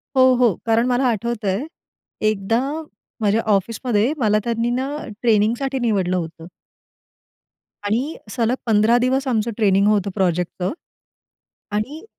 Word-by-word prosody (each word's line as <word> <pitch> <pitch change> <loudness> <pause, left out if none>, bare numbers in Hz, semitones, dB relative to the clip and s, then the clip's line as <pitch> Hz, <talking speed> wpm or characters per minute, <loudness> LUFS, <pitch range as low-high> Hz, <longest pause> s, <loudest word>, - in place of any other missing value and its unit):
हो, 260 0 +6
हो. 240 -6 +3
कारण 230 +1 +3
मला 250 +1 +1
आठवतंय, 225 0 -1 0.6
एकदा 215 +2 +1 0.6
माझ्या 210 +2 +2
ऑफिसमध्ये 225 +4 0
मला 215 -4 +2
त्यांनी 235 0 -1
ना 255 +3 -1 0.3
ट्रेनिंगसाठी 235 +4 +1
निवडलं 195 -6 +1
होतं. 165 -1 -6 1.4
आणि 250 +10 -1
सलग 235 +2 0
15 220 +1 +4
दिवस 265 +2 +1
आमचं 230 -2 0
ट्रेनिंग 200 -2 +3
होतं 205 -2 +2
प्रोजेक्टचं. 180 - -1 1.0
आणि 265 - -3
225 Hz, 115 wpm, -21 LUFS, 205-245 Hz, 1.4 s, हो